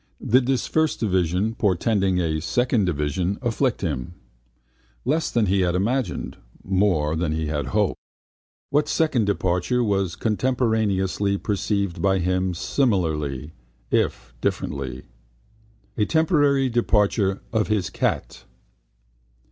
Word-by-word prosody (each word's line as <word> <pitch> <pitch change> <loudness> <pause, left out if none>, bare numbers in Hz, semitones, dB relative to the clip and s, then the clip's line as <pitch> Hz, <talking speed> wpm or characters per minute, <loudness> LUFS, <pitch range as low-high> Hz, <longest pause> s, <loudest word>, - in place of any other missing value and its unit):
Did 125 +2 +3
that 130 -2 +2
first 160 -1 0
division, 95 0 +1
portending 100 -2 +1
a 80 -3 -1
second 120 - +1
division, 85 +4 -1
afflict 120 +1 0
him? 80 -2 -3 0.9
Less 155 +4 +1
than 115 -2 +2
he 95 0 +2
had 90 -1 +1
imagined, 115 +2 -1 0.3
more 90 -6 +1
than 80 -1 -1
he 80 0 -2
had 75 -2 -2
hoped. 65 - 0 0.7
What 150 +1 +2
second 140 -9 +1
departure 95 +3 0
was 95 -5 0
contemporaneously 105 -5 0
perceived 100 -2 -1
by 95 -1 +3
him 90 0 0
similarly, 80 - -1 0.4
if - - 0
differently? 65 -3 -3 0.9
A 105 - +2
temporary 145 - +3
departure 105 -4 +1
of 110 -1 +1
his 105 -4 0
cat. - - -2
100 Hz, 115 wpm, -23 LUFS, 85-115 Hz, 0.9 s, Did